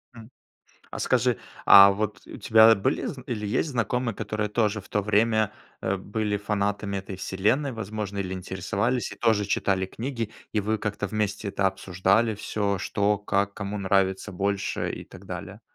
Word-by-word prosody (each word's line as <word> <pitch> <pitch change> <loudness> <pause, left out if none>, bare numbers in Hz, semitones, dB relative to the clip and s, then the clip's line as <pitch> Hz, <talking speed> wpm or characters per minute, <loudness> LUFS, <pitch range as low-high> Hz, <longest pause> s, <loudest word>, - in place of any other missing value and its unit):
М. 115 -1 -12 0.6
А - - -6
скажи, 125 -1 +2 0.3
а 100 0 +10
вот 105 +1 -3
у - - -9
тебя 110 0 +6
были 100 - -1
зн 130 - -5
или 105 -4 -3
есть 145 +8 0
знакомые, 120 -1 -1
которые 105 0 -3
тоже 105 -1 0
в 95 - -19
то 105 - 0
время, 110 +1 +2 0.3
э, 95 - 0
были 105 +2 -2
фанатами 100 -1 -1
"Этой 95 0 -6
вселенной", 105 +10 0
возможно, 105 -2 -5
или 95 -1 -3
интересовались 100 +6 -2
и - - -8
тоже 110 -3 +2
читали 95 -1 0
книги? 115 +1 -4 0.2
И 105 - +2
вы 110 +2 0
как-то 105 -1 -3
вместе 105 0 -2
это 100 0 +1
обсуждали 95 +4 +1
всё: 100 -1 -1
что, 100 +2 0
как, 100 -1 0
кому 100 +1 -4
нравится 95 +1 +1
больше, 100 +2 -1
и - - -7
так - - -14
далее? - - -7
105 Hz, 170 wpm, -26 LUFS, 100-110 Hz, 0.6 s, а